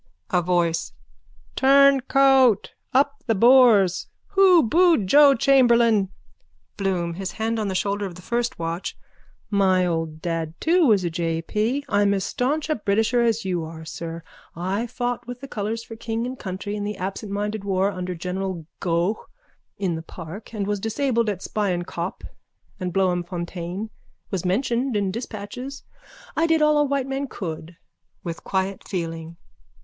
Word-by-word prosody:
A 180 - +3
VOICE: 170 -1 0 0.6
Turncoat! 270 -3 +4 0.2
Up 280 +3 +1
the 225 - +2
Boers! 230 -5 +5 0.2
Who 380 -4 +6
booed 330 - +4
Joe 280 +7 +7
Chamberlain? 235 -6 +4 0.7
BLOOM: 180 -4 -1
(His 190 +2 -5
hand 225 +1 -1
on 215 - -1
the 190 - -2
shoulder 200 +1 -1
of 175 - -10
the 180 - -12
first 240 +1 -1
watch.) 165 +2 -4 0.5
My 190 -2 +3
old 165 -2 -2
dad 165 -1 -3
too 335 -1 +3
was 205 -5 +4
a 170 - -1
J. 165 0 -2
P. 235 +10 -1
I'm 205 0 +2
as 195 - -1
staunch 285 +9 -1
a 310 - +1
Britisher 220 +3 +1
as 230 -3 +1
you 180 -3 -1
are, 160 0 -8
sir. 165 0 -6 0.3
I 190 +7 -2
fought 245 -1 -3
with 245 0 -7
the 275 - -8
colours 220 0 -3
for 225 - -10
king 225 +1 -3
and 255 +1 -6
country 195 +2 -5
in 205 - -3
the 210 +1 -4
absentminded 205 +2 -3
war 195 0 +1
under 180 -1 -4
general 180 0 -4
Gough 175 +4 0 0.6
in 190 -4 -1
the 160 - -4
park 165 +5 -10
and 210 -3 -3
was 205 0 -1
disabled 230 +1 0
at 195 -2 -4
Spion 190 -5 -1
Kop 175 +1 -5 0.6
and 180 -2 -3
Bloemfontein, 180 +2 -2 0.4
was 190 -3 -2
mentioned 240 +5 0
in 200 -2 0
dispatches. 235 +5 -7 0.5
I 330 - +2
did 325 -1 +3
all 300 0 +4
a - - +5
white 280 -2 0
man 270 +1 -3
could. 165 -5 -7 0.5
_(With 170 -1 -5
quiet 190 0 -2
feeling.) 165 -2 -5
205 Hz, 155 wpm, -23 LUFS, 180-245 Hz, 0.7 s, Joe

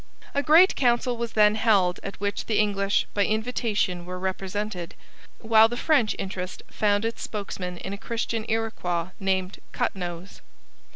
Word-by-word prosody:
A 285 - +1
great 325 +6 +6
council 245 -1 +2
was 235 -1 -4
then 210 -1 +5
held 205 -5 +2
at 195 - -7
which 205 0 -2
the 220 - +1
English, 200 -1 +1
by 205 - +2
invitation, 215 -5 -1
were 180 +1 -6
represented, 190 0 -4 0.5
while 225 -1 +6
the 240 - -4
French 265 -7 +2
interest 190 -1 -5
found 205 0 +1
its 230 - -3
spokesman 185 -4 -5
in 190 - -6
a 200 - -7
Christian 230 0 -3
Iroquois 185 -6 -1
named 190 0 -1
Cut - - -1
Nose. 175 0 -7
205 Hz, 155 wpm, -25 LUFS, 190-225 Hz, 0.5 s, great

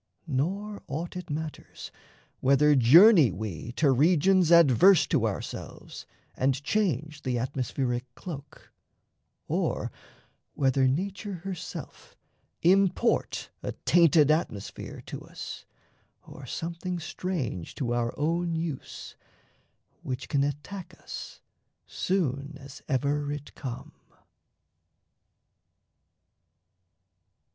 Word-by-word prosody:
Nor 195 +9 -2
aught 160 +7 -4
it 180 -1 -7
matters 155 +1 -6 0.5
whether 140 +3 +4
journey 150 - +7
we 100 +1 -5
To 145 +1 +3
regions 170 +5 +4
adverse 170 - +7
to - - +1
ourselves - - -7 0.3
and 135 +1 0
change 155 - -1
The 125 -3 -1
atmospheric 125 0 -2
cloak, 145 -5 -9 0.7
or - - -1 0.6
whether 135 -1 +3
nature 195 +7 -2
Herself 190 -3 -7 0.5
import 195 +5 +2
a - - -4
tainted 160 -3 +5
atmosphere 155 - -3
To - - -7
us - - -8 0.6
or 135 - -11
something 170 +5 -4
strange 160 - -4
to 120 -4 -2
our 120 -1 0
own 170 +3 0
use 160 -4 -5 0.9
Which 130 0 -5
can 140 -2 +2
attack 150 +6 -5
us - - -8 0.4
soon 145 -6 -2
as 140 +2 -11
ever 145 +1 0
it 145 0 -7
come. 125 -4 -7
150 Hz, 95 wpm, -28 LUFS, 130-175 Hz, 0.9 s, journey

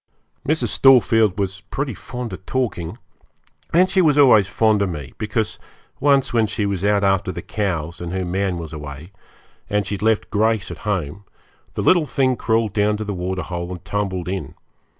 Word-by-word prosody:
Mrs. 155 +1 +1
Storefield 115 -6 +4
was 95 -1 -2
pretty 135 -2 -2
fond 125 -1 -6
of 90 - -8
talking, 105 -8 -2 0.7
and 180 +3 +5
she 190 0 +2
was 150 -4 +3
always 115 -9 +6
fond 110 0 +2
of 100 - +1
me, 70 -7 -7
because 110 0 -2 0.4
once 140 -2 +3
when 115 -2 +3
she 105 0 -2
was 100 -2 -2
out 100 0 +2
after 95 -1 +2
the - - -7
cows, 85 -6 -3
and 85 -1 -5
her 95 0 -2
man 95 0 -1
was 80 -2 -7
away, 75 +3 -8 0.6
and 105 -1 0
she - - -4
had 100 - -4
left 110 0 +1
Grace 110 0 +1
at - - -8
home, 95 -1 -2 0.5
the - - -2
little 175 -4 +4
thing 130 -2 +1
crawled 110 -3 0
down 105 0 +2
to 110 - -4
the 105 -1 -4
waterhole 90 -1 -4
and 90 -2 -8
tumbled 95 -4 -2
in. 95 +1 -4
100 Hz, 185 wpm, -21 LUFS, 90-115 Hz, 0.7 s, always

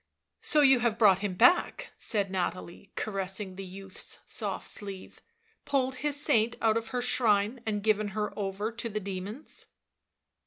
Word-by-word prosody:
" - - -56
So 300 - +4
you 270 -3 +6
have 235 -2 +1
brought 200 -5 +6
him 200 -3 -2
back," 355 - +4
said 200 -4 0
Nathalie, 185 +1 -3
caressing 195 -1 -3
the 195 - -6
youth's 190 0 -7
soft - - -4
sleeve; 195 -2 -6 0.2
" 455 - -36
pulled 265 -2 +1
his 290 0 -1
saint 230 -5 +3
out 220 -1 +3
of 225 0 -1
her 245 0 -2
shrine 225 -1 +2
and 210 -2 -1
given 215 -1 +2
her 210 0 -1
over 205 +2 -2
to 235 0 -4
the 215 0 -2
demons." 200 +6 -6
210 Hz, 165 wpm, -29 LUFS, 195-235 Hz, 0.2 s, you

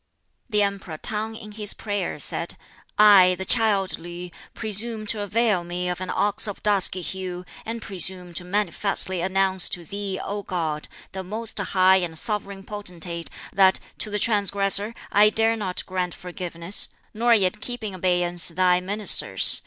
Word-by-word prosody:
The 210 -2 +2
Emperor 195 -5 -4
T'ang 220 +5 -4
in 215 -2 -11
his 210 -1 -2
prayer, 205 -3 -3
said, - - -2 0.4
"I, 195 -4 +7
the 190 - -4
child 205 -5 +3
Li, 175 +1 -8 0.2
presume 220 +1 -1
to 210 0 -1
avail 205 -2 +1
me 175 +1 -4
of 180 +1 -4
an 185 - -5
ox 205 +1 +1
of 205 - -7
dusky 195 -3 +3
hue, 180 0 -6 0.2
and 230 -1 -5
presume 180 -1 0
to 180 - -1
manifestly 195 -1 0
announce 190 0 +2
to 175 -2 -4
Thee, 200 +2 -5
O 205 +1 -4
God, 160 -5 -3 0.2
the 190 0 -6
most 215 +4 -3
high 190 -1 +4
and 170 -3 -2
Sovereign 200 +1 -3
Potentate, 175 -5 -5 0.2
that 190 -1 +4 0.2
to - - -2
the 210 - -2
transgressor 200 0 +1 0.2
I 210 +1 +6
dare 225 +1 +2
not 190 -5 -3
grant 185 -1 -3
forgiveness, 175 0 -1 0.2
nor 235 +2 +3
yet 195 0 0
keep 245 -1 -5
in 210 -3 -4
abeyance 175 -1 +1
Thy 180 +1 +2
ministers. 205 +3 +4
195 Hz, 160 wpm, -23 LUFS, 180-210 Hz, 0.4 s, I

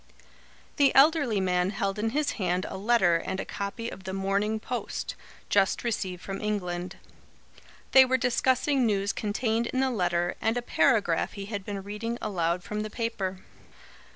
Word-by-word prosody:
The 280 -1 +4
elderly 280 -6 +5
man 180 -1 +1
held 195 0 -2
in 225 +2 0
his 295 +5 0
hand 180 +1 0
a - - -6
letter 195 -4 +3
and 190 +3 -4
a - - -3
copy 200 +4 -4
of 190 - -8
the 190 0 -5
MORNING 200 +3 0
POST, 245 +2 -4 0.3
just 195 +3 +2
received 190 -6 -3
from 195 0 -5
England. 180 -4 -3 1.0
They 265 - +9
were 260 0 +2
discussing 260 +2 +2
news 200 0 0
contained 225 +2 -1
in 260 - -2
the 265 0 +2
letter 175 -5 0
and 225 +2 +1
a 245 - -2
paragraph 200 -8 +2
he 200 -1 -6
had 205 -1 -5
been 200 -1 -5
reading 220 +4 -4
aloud 175 -3 -1
from 210 +3 -4
the 215 0 -3
paper. 210 -5 -3
205 Hz, 165 wpm, -27 LUFS, 190-235 Hz, 1.0 s, They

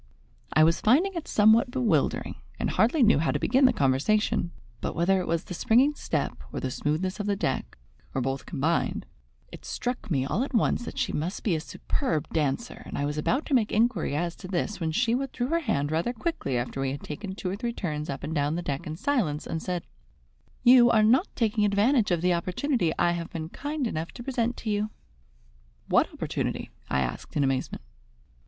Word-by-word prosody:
I 155 - +5
was 165 +1 +3
finding 320 - +4
it 335 -3 -5
somewhat 220 +4 +5
bewildering, 225 - 0 0.2
and - - -1
hardly 245 +6 +3
knew 220 -8 +5
how 160 - +1
to - - +1
begin 265 +1 +3
the 255 - +6
conversation; 150 +9 +1 0.3
but - - -3
whether 190 +3 +3
it 180 - -3
was 165 +1 0
the - - -7
springing 250 - +3
step, - - -3
or - - -4
the 130 - -3
smoothness 165 +10 -1
of 205 - -2
the 200 - +1
deck, 135 -10 -2 0.4
or - - +1
both 135 +1 -2
combined, 160 +5 0 0.5
it - - -11
struck 245 -3 -4
me 135 -6 +1
all 195 - 0
at 275 -1 -4
once 235 +1 +2
that - - -7
she - - -1
must 170 +6 -3
be 200 - +1
a - - -1
superb 160 - -2
dancer, 155 - -1
and - - -5
I 145 - 0
was 150 +1 -2
about 260 - 0
to - - -3
make 230 -5 +3
inquiry 225 - +1
as 170 +2 -1
to - - -9
this 190 +2 -2
when 160 -2 -1
she 230 +7 +1
withdrew 255 -1 -2
her 335 +1 +2
hand 150 - -1
rather 170 +10 0
quickly 230 - -2
after 125 +3 -3
we 135 - 0
had 140 +1 -5
taken 190 +6 -6
two 185 -2 -3
or - - -2
three 235 +3 -3
turns 155 -9 -4
up 140 -1 -5
and 155 +2 -3
down 145 0 0
the 175 - -3
deck 140 -1 -3
in 155 - -4
silence, 200 - 0
and 165 - -3
said: 180 -2 -3 0.8
"You 245 -1 +8
are 220 -2 +4
not 255 - +4
taking 215 -2 +1
advantage 210 +4 +3
of 175 -3 +1
the 180 0 +4
opportunity 180 - 0
I 175 - +3
have 170 -1 -3
been 160 -1 -5
kind 290 - -3
enough 165 -7 -3
to 240 - -8
present 240 -2 -1
to 220 - -3
you." 210 +1 0 1.0
"What - - +3
opportunity?" - - -3 0.2
I 65 - +1
asked 60 - -4
in 145 - +3
amazement. 135 - -1
190 Hz, 210 wpm, -27 LUFS, 155-240 Hz, 1.0 s, You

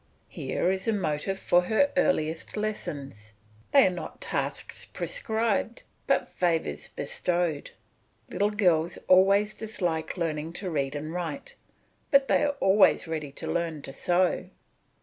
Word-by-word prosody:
Here 180 - -1
is 190 +3 -3
a 225 - +3
motive 190 0 -1
for 175 -2 +3
her 280 +8 +2
earliest 165 - 0
lessons, 140 - -5 0.4
they 275 -1 +7
are 185 - +3
not 180 - -7
tasks - - -3
prescribed, 225 - -1 0.2
but - - +2
favours 160 - -1
bestowed. 170 -4 -1 0.6
Little 205 +1 0
girls 175 -6 +2
always 195 +3 +5
dislike 175 -7 -3
learning 160 -1 -2
to 185 0 -4
read 140 -2 -1
and 155 +2 -5
write, 170 -5 -5 0.6
but 275 -1 +5
they - - +3
are 285 -1 +1
always 195 -2 +4
ready 155 -3 -4
to - - -7
learn 165 -4 -2
to 135 - -6
sew. 180 +5 +1
180 Hz, 135 wpm, -27 LUFS, 155-210 Hz, 0.6 s, they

